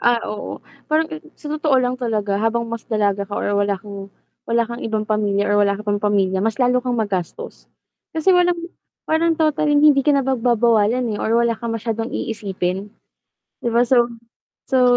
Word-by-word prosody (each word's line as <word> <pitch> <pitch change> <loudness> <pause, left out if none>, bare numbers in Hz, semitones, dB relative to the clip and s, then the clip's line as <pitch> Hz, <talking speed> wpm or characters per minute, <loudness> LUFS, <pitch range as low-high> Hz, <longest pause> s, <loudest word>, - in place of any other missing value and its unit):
Ah, 240 0 +4 0.2
oo, 210 - -7 0.2
parang 315 +1 +1 0.2
sa 295 -1 -6
totoo 305 -3 +2
lang 250 -1 +2
talaga 210 -4 -1
habang 235 +1 +1
mas 230 -1 -7
dalaga 205 -3 0
ka 205 - -4
or 205 - -1
wala 200 0 +1
kang 200 0 -9 0.4
wala 235 0 +2
kang 235 +2 -7
ibang 220 -1 -2
pamilya 205 -2 0
or 205 - +4
wala 200 -1 +2
ka 210 - -9
pang 205 -1 0
pamilya, 195 -2 +1
mas 220 +1 0
lalo 250 -1 +2
kang 245 -1 -2
magastos. 195 -6 -4 0.5
Kasi 320 +4 +3
walang 355 -1 +3 0.5
parang 325 +1 +1
total 305 -1 +1
hindi 295 +1 +6
ka 285 +1 +3
na 275 - +1
pagbabawalan, 235 -2 +2
eh, 205 - -4
or 225 +1 +1
wala 235 - +2
kang 225 0 -4
masyadong 225 +1 -3
iisipin. 195 -3 -3 0.7
‘Di 235 - -1
ba, 235 +1 +3
so 240 -1 +3 0.6
so, 250 -2 +4
230 Hz, 180 wpm, -20 LUFS, 205-255 Hz, 0.7 s, hindi